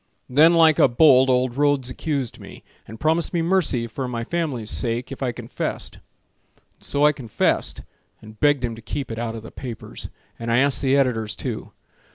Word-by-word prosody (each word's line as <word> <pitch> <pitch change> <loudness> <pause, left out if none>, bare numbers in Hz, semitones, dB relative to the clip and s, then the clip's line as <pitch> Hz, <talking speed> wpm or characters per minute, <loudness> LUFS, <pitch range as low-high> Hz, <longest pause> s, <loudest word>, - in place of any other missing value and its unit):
Then 155 +6 +5
like 160 -2 +5
a - - +7
bolt 130 +1 +5
old 125 -1 +1
Rhodes 145 -3 +1
accused 140 -3 -3
me, - - -12 0.2
And 110 +1 -10
promised 160 +3 +1
me 165 - +1
mercy 165 -9 +1
for 125 +3 -5
my 120 -2 -3
family's 135 -8 -2
sake 120 +1 -1
If 135 - -8
I 130 -2 0
confessed, 115 - -5 0.6
and - - -25
so 145 +1 +2
I 150 - +6
confessed, 125 -7 -1 0.4
And 110 0 -14
begged 145 -3 +3
him 115 - -4
to 115 - -11
keep 135 +2 -5
it 115 - -5
out 115 -1 -3
of 110 - -8
the - - -10
papers, 125 -4 -8 0.3
And 115 0 -3
I 115 - +3
asked 140 +1 +2
the 135 0 +3
editors, 115 -6 0
too. - - -5
130 Hz, 195 wpm, -23 LUFS, 115-145 Hz, 0.6 s, a